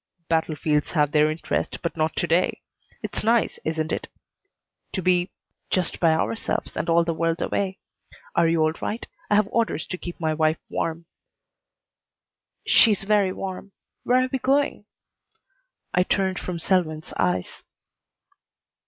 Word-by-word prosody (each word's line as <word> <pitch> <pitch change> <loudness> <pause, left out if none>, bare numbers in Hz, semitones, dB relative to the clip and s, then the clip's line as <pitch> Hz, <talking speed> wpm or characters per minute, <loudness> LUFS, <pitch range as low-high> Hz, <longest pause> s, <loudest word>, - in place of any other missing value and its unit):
"Battlefields 155 -2 0
have 150 -3 +2
their 150 0 +4
interest, 155 +2 -2
but 170 - -2
not 160 0 0
to - - 0
day. 170 +2 +1 0.4
It's - - -3
nice, 230 +1 +2
isn't 160 0 -1
it, - - -2 0.9
to 190 - -1
be 180 0 +3 0.4
just 185 -2 0
by 165 -2 +4
ourselves 190 +8 -1
and 170 - -2
all 170 0 +5
the 165 0 -1
world 165 +1 0
away? 190 -1 -1 0.6
Are 165 - +4
you 165 -1 +3
all 155 - +3
right? 225 - -3 0.2
I 210 - +4
have 210 -1 +4
orders 225 -9 0
to 185 - -5
keep 175 - -7
my 160 -2 0
wife 155 0 +2
warm." 165 +1 -2 1.6
"She's 210 -4 +5
very 200 -2 +3
warm. 190 +1 -6 0.3
Where 255 +1 +3
are 255 - -2
we 265 - +1
going?" 275 -4 +1 1.1
I 180 - +4
turned 190 0 0
from 180 -2 -4
Selwyn's 160 -3 0
eyes. 90 0 -1
170 Hz, 145 wpm, -24 LUFS, 160-195 Hz, 1.6 s, all